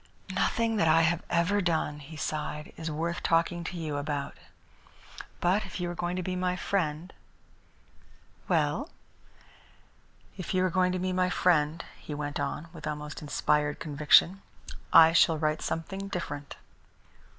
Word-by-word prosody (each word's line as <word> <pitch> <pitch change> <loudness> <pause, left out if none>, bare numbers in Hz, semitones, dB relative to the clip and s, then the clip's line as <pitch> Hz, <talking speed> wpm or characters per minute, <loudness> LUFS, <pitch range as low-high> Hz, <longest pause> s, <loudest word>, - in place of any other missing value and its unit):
"Nothing 230 -2 +1
that 165 - +3
I 165 +1 +5
have 160 +1 +2
ever 180 +4 +2
done," 160 -4 0
he 150 +2 -11
sighed, 150 0 -4
"is 160 0 -5
worth 165 +3 -2
talking 170 +1 +1
to 180 - -5
you 155 -3 -3
about. 145 -1 -3 1.0
But 185 +4 +2
if - - -7
you 175 -1 -2
are - - -4
going 175 +1 -3
to 185 - -2
be 185 +1 -3
my 180 0 0
friend 175 -2 -2 0.7
" - - -31
"Well?" - - +1 1.5
"If 185 0 -4
you 185 0 +3
are 185 - 0
going 180 0 +2
to - - -1
be 185 0 -1
my 185 0 +2
friend," 165 -3 +2
he 150 - -7
went 145 0 -4
on, 170 +3 -3
with 155 -3 -8
almost 150 -1 -5
inspired 150 0 0
conviction, 155 +5 +4 0.5
"I 165 0 +8
shall 165 -1 +5
write 155 0 0
something 195 +4 -4
different." 145 -6 -5
165 Hz, 155 wpm, -29 LUFS, 150-180 Hz, 1.5 s, I